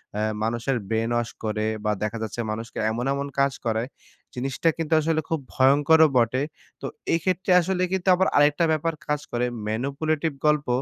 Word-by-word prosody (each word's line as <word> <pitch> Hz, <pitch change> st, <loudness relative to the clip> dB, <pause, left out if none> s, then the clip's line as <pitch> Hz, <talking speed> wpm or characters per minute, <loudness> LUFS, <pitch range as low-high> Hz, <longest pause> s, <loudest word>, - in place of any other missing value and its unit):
অ্যা 105 Hz, -, -1 dB, 0.2 s
মানুষের 120 Hz, +3 st, -1 dB
brain 115 Hz, +1 st, 0 dB
wash 120 Hz, 0 st, -1 dB
করে 110 Hz, 0 st, -1 dB, 0.2 s
বা 105 Hz, -, +2 dB
দেখা 110 Hz, +2 st, -2 dB
যাচ্ছে 110 Hz, +2 st, -6 dB
মানুষকে 115 Hz, +2 st, -6 dB
এমন, 120 Hz, +3 st, -3 dB
এমন 140 Hz, 0 st, -3 dB
কাজ 140 Hz, -1 st, +3 dB
করায় 115 Hz, +2 st, 0 dB, 0.5 s
জিনিসটা 135 Hz, +6 st, 0 dB
কিন্তু 165 Hz, -1 st, -2 dB
আসলে 160 Hz, 0 st, +1 dB
খুব 160 Hz, -2 st, 0 dB
ভয়ংকরও 145 Hz, +4 st, +5 dB
বটে। 120 Hz, +2 st, +2 dB, 0.4 s
তো -, -, -5 dB, 0.3 s
এই 165 Hz, -, +2 dB
ক্ষেত্রে 185 Hz, 0 st, 0 dB
আসলে 185 Hz, +1 st, -1 dB
কিন্তু 190 Hz, 0 st, -2 dB
আবার 190 Hz, +1 st, +2 dB
আরেকটা 145 Hz, +3 st, +4 dB
ব্যাপার 160 Hz, +1 st, 0 dB
কাজ 150 Hz, 0 st, 0 dB
করে 120 Hz, +1 st, 0 dB, 0.2 s
manipulative 145 Hz, +6 st, -1 dB
গল্প 150 Hz, -2 st, +2 dB
140 Hz, 170 wpm, -24 LUFS, 115-160 Hz, 0.5 s, ভয়ংকরও